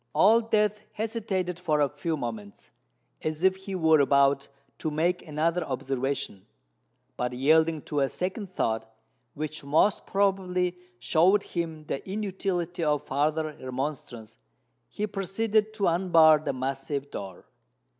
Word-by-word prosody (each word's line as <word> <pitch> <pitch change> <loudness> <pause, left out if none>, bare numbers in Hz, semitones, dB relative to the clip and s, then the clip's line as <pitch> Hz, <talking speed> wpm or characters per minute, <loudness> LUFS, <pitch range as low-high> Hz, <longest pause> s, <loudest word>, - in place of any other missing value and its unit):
Old 225 +3 +5
Death 210 -1 +2
hesitated 205 -5 -2
for 155 -4 +1
a 145 - +4
few 155 +3 -3
moments, 110 -6 -7 0.5
as 155 +2 -3
if 190 0 +5
he 190 0 -6
were 160 -3 +4
about 140 0 +3 0.3
to 155 - -2
make 170 +4 0
another 165 +3 0
observation: 135 -6 -3 0.7
but, 125 0 -2
yielding 155 +4 +3
to 150 - -2
a 135 -1 +2
second 185 +1 -4
thought, 110 0 -1 0.4
which 155 0 -5
most 155 +8 +2
probably 185 -2 +1 0.2
showed 175 +11 +3
him 165 -3 -4
the 135 - -3
inutility 190 -4 -2
of 150 -2 +1
farther 155 +2 -1
remonstrance, 130 -4 -5 0.5
he 210 - -3
proceeded 210 +2 0
to 215 -2 -1
unbar 165 -3 +5
the 155 - -2
massive 135 +2 -3
door. 95 -2 -7
160 Hz, 130 wpm, -27 LUFS, 140-190 Hz, 0.7 s, Old